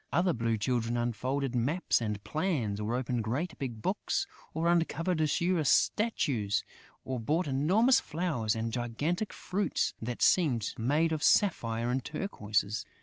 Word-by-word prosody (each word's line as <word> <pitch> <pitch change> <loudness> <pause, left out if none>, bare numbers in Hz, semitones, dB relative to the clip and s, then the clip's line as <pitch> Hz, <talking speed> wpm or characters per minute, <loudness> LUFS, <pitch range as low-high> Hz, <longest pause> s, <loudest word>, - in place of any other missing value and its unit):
Other 175 0 +2
Blue 115 -1 0
Children 120 +1 0
unfolded 125 +3 -1
maps 130 +6 +1
and 105 -2 -3
plans, 150 - -1
or 110 +3 -1
opened 125 -2 -1
great 150 +10 -2
big 120 -5 -5
books, - - 0 0.3
or 160 +2 -1
uncovered 170 0 +1
azure 170 +2 +1
statues, 135 - +1 0.4
or 130 -1 -3
brought 155 +10 0
enormous 190 - +4
flowers 150 -10 -1
and 115 0 -3
gigantic 145 - -2
fruits 190 -2 -1
that 120 +1 -3
seemed 135 - +3
made 150 +8 +1
of 155 -2 -1
sapphires 120 - +2
and 130 0 -1
turquoises. 110 - -2
130 Hz, 140 wpm, -30 LUFS, 115-165 Hz, 0.4 s, enormous